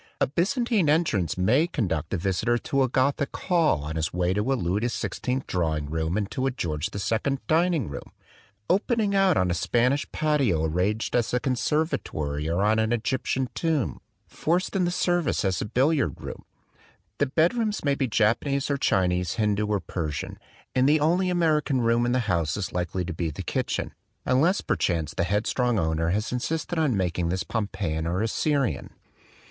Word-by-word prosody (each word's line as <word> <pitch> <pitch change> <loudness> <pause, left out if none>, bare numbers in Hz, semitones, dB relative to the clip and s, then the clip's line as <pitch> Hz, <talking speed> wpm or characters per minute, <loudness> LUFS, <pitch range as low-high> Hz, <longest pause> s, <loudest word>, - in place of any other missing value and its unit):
A - - +4
Byzantine 200 - +1
entrance 145 - +1
may 120 - +3
conduct 95 - -2
the 100 - -1
visitor 100 +7 0
to 135 +3 -1
a 130 - +2
Gothic 140 +3 0
hall 165 - +2
on 80 +2 -4
his 80 0 -1
way 90 +1 0
to 105 +7 0
a - - +3
Louis 95 -3 0
XVI 125 +2 -2
drawing 80 -4 -1
room 80 +3 -1
and 100 -2 -2
to 130 +1 -1
a - - +3
George 80 - -3
II 110 +7 -1
dining 165 - +2
room, 70 - -8 0.6
opening 205 +1 +1
out 195 -3 +4
on 90 -1 +2
a - - +2
Spanish 125 - +1
patio 135 - +1
arranged 95 +7 -1
as 120 0 +1
a - - +2
conservatory 120 - -1
or 85 +4 +1
on 110 +1 +3
an 110 +1 +1
Egyptian 130 +2 -1
tomb 160 -7 -1 0.3
forced 180 +5 -1
into 180 -2 +2
service 175 - 0
as 95 -2 0
a - - -2
billiard 130 - +1
room. - - -8 0.7
The 145 - +2
bed 160 - +2
rooms 220 -7 -1
may 140 - +3
be 135 -1 0
Japanese 130 +6 +1
or 140 - +1
Chinese, 90 -7 +1
Hindu 105 -1 0
or 105 -1 +1
Persian; 80 -4 -4 0.3
and 130 +2 +3
the 155 +1 +4
only 175 +5 +2
American 155 -6 +2
room 120 0 +2
in - - +1
the 125 0 +2
house 85 -7 0
is 100 - -4
likely 90 +1 -2
to 90 - -4
be 80 0 -2
the 75 - -6
kitchen, - - -2 0.3
unless 155 +10 +3
per - - 0
chance 85 -4 -1
the 85 - 0
headstrong 110 +5 0
owner 80 -1 0
has 105 +5 -1
insisted 160 +7 -2
on 140 -9 +2
making 90 -2 -1
this 95 +1 -1
Pompeian 85 -7 -2
or 90 +5 0
Assyrian. 140 +4 0
120 Hz, 180 wpm, -26 LUFS, 90-150 Hz, 0.7 s, A